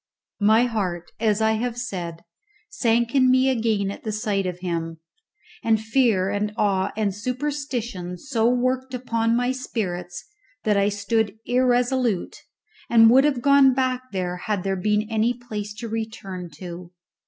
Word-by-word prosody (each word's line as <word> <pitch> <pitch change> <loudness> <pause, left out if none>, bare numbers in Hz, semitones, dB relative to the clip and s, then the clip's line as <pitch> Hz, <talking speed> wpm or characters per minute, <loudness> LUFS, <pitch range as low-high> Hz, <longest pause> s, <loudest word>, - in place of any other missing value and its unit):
My 220 +3 +5
heart, 185 -8 -2
as 220 -1 +1
I 220 - +3
have 235 +2 -2
said, 175 -9 -5 0.5
sank 235 - +1
in 260 -2 +4
me 260 +1 +4
again 220 -5 0
at - - -9
the 220 - -3
sight 205 -2 -1
of 180 -1 -4
him, 165 -2 -3 0.6
and 225 -1 +3
fear 220 -4 +2
and 205 +1 -1
awe 195 -3 +1
and 210 -3 0
superstition 245 -6 -4
so 235 -1 0
worked 255 +1 0
upon 230 -2 0
my 245 +1 +1
spirits 180 -9 -4 0.4
that 210 -1 +2
I 200 0 +3
stood 205 +1 -1
irresolute, 245 -4 +1 0.5
and 225 -1 +7
would 265 +3 +6
have 270 -5 0
gone 280 -2 +6
back 255 -1 -1
had 185 +1 -2
there 195 0 0
been 210 +3 +1
any 225 +2 +1
place 215 -4 -6
to 230 +2 -6
return 220 -5 -5
to. 175 +1 -8
220 Hz, 150 wpm, -23 LUFS, 195-245 Hz, 0.6 s, and